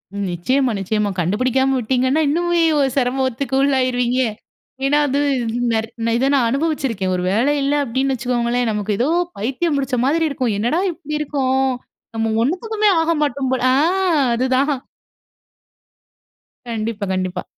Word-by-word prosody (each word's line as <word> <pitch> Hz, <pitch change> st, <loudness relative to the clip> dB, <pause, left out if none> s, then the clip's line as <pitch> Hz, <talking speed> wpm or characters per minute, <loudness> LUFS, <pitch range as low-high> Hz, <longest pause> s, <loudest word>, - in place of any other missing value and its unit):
ம். 200 Hz, 0 st, -2 dB
நிச்சயமா, 255 Hz, +9 st, +1 dB
நிச்சயமா. 210 Hz, +2 st, -1 dB
கண்டுபுடிக்காம 255 Hz, +9 st, +1 dB
விட்டீங்கன்னா, 260 Hz, +5 st, +1 dB
இன்னுமே 345 Hz, +3 st, +1 dB, 0.2 s
ஒரு 275 Hz, -1 st, +2 dB
சிரமத்துக்கு 260 Hz, 0 st, 0 dB
உள்ளாயிருவீங்க 255 Hz, -2 st, +1 dB, 0.7 s
ஏனா, 290 Hz, +2 st, +3 dB
அது 280 Hz, +1 st, 0 dB, 0.5 s
நெர் 220 Hz, 0 st, 0 dB, 0.3 s
இத 245 Hz, +3 st, +1 dB
நான் 260 Hz, -4 st, +3 dB
அனுபவிச்சுருக்கேன். 265 Hz, -, -1 dB
ஒரு 180 Hz, -, -2 dB
வேல 235 Hz, +9 st, +2 dB
இல்ல, 275 Hz, +1 st, +1 dB
அப்பிடின்னு 265 Hz, +2 st, -1 dB
வச்சுக்கோங்களேன், 240 Hz, -1 st, 0 dB
நமக்கு 210 Hz, 0 st, -2 dB
ஏதோ, 245 Hz, -, +2 dB, 0.3 s
பைத்தியம் 275 Hz, +8 st, -1 dB
பிடுச்ச 270 Hz, -2 st, -1 dB
மாதிரி 325 Hz, +4 st, +2 dB
இருக்கும். 255 Hz, -4 st, -1 dB
என்னடா! 240 Hz, +11 st, 0 dB
இப்பிடி 305 Hz, -3 st, -6 dB
இருக்கோம். 265 Hz, -3 st, 0 dB, 0.4 s
நம்ம 225 Hz, 0 st, 0 dB
ஒன்னுத்துக்குமே 420 Hz, -, 0 dB
ஆக 325 Hz, +1 st, +1 dB
மாட்டோம் 275 Hz, -2 st, -1 dB
போல 260 Hz, -, -1 dB
ஆ, -, -, +3 dB, 0.6 s
அதுதான். 260 Hz, +4 st, +1 dB, 2.0 s
கண்டிப்பா. 220 Hz, -2 st, -3 dB
கண்டிப்பா. 185 Hz, -1 st, -2 dB
260 Hz, 130 wpm, -19 LUFS, 230-280 Hz, 2.0 s, ஏனா